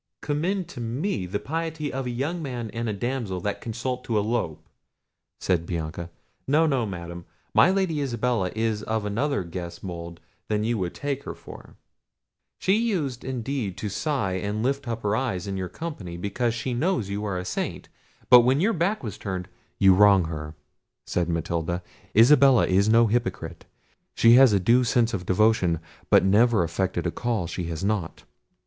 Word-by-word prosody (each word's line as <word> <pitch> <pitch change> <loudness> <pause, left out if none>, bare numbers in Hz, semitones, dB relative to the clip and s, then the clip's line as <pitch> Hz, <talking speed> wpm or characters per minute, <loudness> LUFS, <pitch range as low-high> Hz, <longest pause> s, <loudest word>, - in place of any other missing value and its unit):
"Commend 175 +5 -2
me 120 - -2
to - - -15
the 105 - 0
piety 160 +2 -4
of 135 -1 -3
a - - -2
young 145 +8 -2
fellow 120 -6 -5
and 115 0 -2
a - - -1
damsel 115 -3 -3
that 100 +2 -3
consult 125 +2 -4
to 115 - 0
elope!" 100 -8 -2 0.7
said 85 -3 0
Bianca. 85 0 -4 0.4
"No, 155 +4 +4
no, 135 -7 +1
Madam, 85 -2 -7 0.3
my - - +6
Lady 185 -6 0
Isabella 120 -7 0
is 110 -1 0
of 110 -1 -2
another 110 +2 -1
guess 85 0 -7
mould 85 -2 -7 0.3
than 105 -1 0
you 110 -6 0
take 140 +6 -4
her - - -5
for. - - -13 0.8
She 190 +3 +2
used 170 - -1
indeed 125 -6 -3
to 105 +2 -3
sigh 135 -2 -1
and 105 +3 -2
lift 140 +1 -1
up 115 -1 -4
her 105 +1 +1
eyes 110 -8 -2
in 100 -1 -4
your 95 -1 -3
company, 105 - -6
because 115 +6 -1
she 125 +1 -3
knows 125 - 0
you 100 +1 -3
are 100 -3 -2
a 90 - -4
saint; - - -4 0.4
but 125 - +9
when 130 +4 +2
your 215 +7 +2
back 190 +3 0
was 110 -5 -6
turned—" 95 -2 -4 0.3
"You 95 -1 +6
wrong 100 -2 +6
her," 75 -1 -6 0.5
said 85 -1 -1
Matilda; 85 +1 -2 0.3
"Isabella 135 +1 +7
is 100 +3 +2
no 115 +1 +6
hypocrite; 105 -7 -2 0.5
she 115 0 +6
has 130 -1 +8
a 100 - +3
due 120 +7 +4
sense 120 -1 +2
of 90 -3 -4
devotion, 95 -4 +3 0.3
but - - +5
never 105 +1 +4
affected 85 +1 -2
a 85 - 0
call 115 -5 -2
she 85 +1 -4
has 80 +1 -4
not. 100 -4 -2
110 Hz, 175 wpm, -25 LUFS, 95-130 Hz, 0.8 s, but